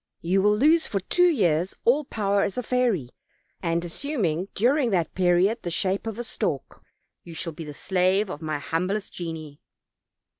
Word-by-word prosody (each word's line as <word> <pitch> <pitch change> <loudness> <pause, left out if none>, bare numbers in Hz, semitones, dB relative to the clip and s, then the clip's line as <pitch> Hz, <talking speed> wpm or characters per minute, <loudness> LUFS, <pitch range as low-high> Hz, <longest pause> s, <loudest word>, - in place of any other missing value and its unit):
You 185 +3 +2
will 210 +1 +3
lose 315 +7 +4
for 195 - -1
two 355 - +3
years 180 - +1
all 275 +5 +3
power 200 -4 0
as 195 - -1
a 250 - -1
fairy, 230 - 0 0.5
and 170 -1 0
assuming 185 - -2
during 250 +4 +3
that 175 -6 0
period 185 +5 +2
the 175 - -4
shape 190 +5 -1
of 220 -1 -4
a 240 - -3
stork, - - -3 0.4
you 170 -2 -10
shall 165 0 -4
be 165 +1 -8
the 150 -1 -8
slave 190 +4 +1
of 170 -4 -7
my 155 -1 -2
humblest 180 +8 -2
genii." 160 -4 -7
190 Hz, 175 wpm, -25 LUFS, 165-225 Hz, 0.5 s, lose